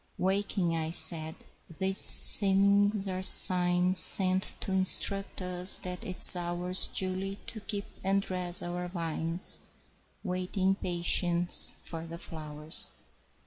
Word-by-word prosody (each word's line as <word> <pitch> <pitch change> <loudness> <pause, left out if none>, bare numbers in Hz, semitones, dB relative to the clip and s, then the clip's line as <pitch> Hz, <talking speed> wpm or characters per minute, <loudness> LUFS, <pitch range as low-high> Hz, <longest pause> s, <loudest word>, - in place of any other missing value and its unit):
Waking, 190 -2 -6
I 160 -1 -8
said, 160 -1 +2 0.4
"These 190 0 +6
things 200 +1 -3
are 185 -1 -10
signs 180 0 +3
Sent 185 -1 +3
to - - -9
insruct 190 +1 -2
us 180 +1 -5
that 180 -1 -12
'tis 185 0 +4
ours 175 +1 -3
Duly 190 +1 -7
to 225 - -7
keep 200 -1 -10 0.2
and 195 +1 -4
dress 180 -2 -6
our 175 0 -11
vines, 165 0 +1 0.6
Waiting 185 0 -8
in - - -3
patience 175 0 -1
for 165 0 -12
the 165 +1 -13
flowers. 155 -2 -9
180 Hz, 120 wpm, -23 LUFS, 175-190 Hz, 0.6 s, These